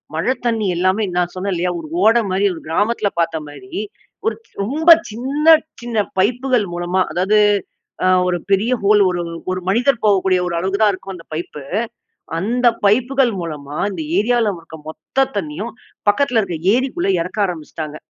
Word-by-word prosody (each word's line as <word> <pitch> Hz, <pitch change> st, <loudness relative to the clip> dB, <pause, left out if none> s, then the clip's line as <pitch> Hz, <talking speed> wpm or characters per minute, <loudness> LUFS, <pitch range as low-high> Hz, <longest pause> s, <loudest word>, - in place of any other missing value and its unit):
மழை 170 Hz, +11 st, +1 dB
தண்ணீ 225 Hz, -3 st, +1 dB
எல்லாமே 185 Hz, +4 st, +2 dB
நான் 175 Hz, 0 st, 0 dB
சொன்னேன் 190 Hz, +1 st, -2 dB
இல்லையா? 180 Hz, +1 st, 0 dB
ஒரு 155 Hz, -, -8 dB, 0.2 s
ஓடை 230 Hz, +2 st, +5 dB
மாதிரி 195 Hz, +2 st, +1 dB
ஒரு 165 Hz, -, -9 dB
கிராமத்துல 205 Hz, +4 st, +1 dB
பார்த்த 165 Hz, -2 st, -1 dB
மாரி, 355 Hz, -, -12 dB, 0.5 s
ஒரு 450 Hz, -, +1 dB, 0.3 s
ரொம்ப 305 Hz, +10 st, 0 dB, 0.2 s
சின்ன 270 Hz, +7 st, -3 dB, 0.4 s
சின்ன 235 Hz, -2 st, -4 dB, 0.2 s
பைப்புகள் 245 Hz, +2 st, +2 dB
மூலமா 175 Hz, +2 st, 0 dB
அதாவது, 190 Hz, +6 st, +2 dB, 0.7 s
அ -, -, +3 dB, 0.2 s
ஒரு 180 Hz, -1 st, +1 dB
பெரிய 205 Hz, +6 st, +2 dB
ஹோல் 210 Hz, +1 st, +5 dB
ஒரு 175 Hz, -1 st, -2 dB, 0.3 s
ஒரு 185 Hz, -, -2 dB
மனிதர் 240 Hz, +4 st, +2 dB
போகக்கூடிய 190 Hz, -3 st, +3 dB
ஒரு 170 Hz, -, -3 dB
அளவுக்கு 190 Hz, +3 st, -1 dB
தான் 210 Hz, -1 st, +5 dB
இருக்கும் 195 Hz, +1 st, -7 dB
அந்த 165 Hz, -2 st, -13 dB
பைப்பு, 155 Hz, -2 st, -5 dB, 0.8 s
அந்த 240 Hz, +7 st, 0 dB, 0.2 s
பைப்புகள் 250 Hz, +4 st, +3 dB
மூலமா 150 Hz, -3 st, -6 dB
இந்த 180 Hz, -5 st, -5 dB, 0.2 s
ஏரியால 230 Hz, 0 st, +2 dB
இருக்குற 160 Hz, -1 st, -12 dB
மொத்த 270 Hz, +11 st, -1 dB
தண்ணணீயும், 200 Hz, +6 st, -4 dB, 0.4 s
பக்கத்துல 245 Hz, +1 st, +3 dB
இருக்க 175 Hz, -4 st, -4 dB, 0.2 s
ஏரிக்குள்ள 265 Hz, -, -1 dB
எறக்க 180 Hz, +5 st, -7 dB
ஆரம்பிச்சுட்டாங்க. 155 Hz, -3 st, -6 dB
200 Hz, 155 wpm, -19 LUFS, 175-235 Hz, 0.8 s, ஓடை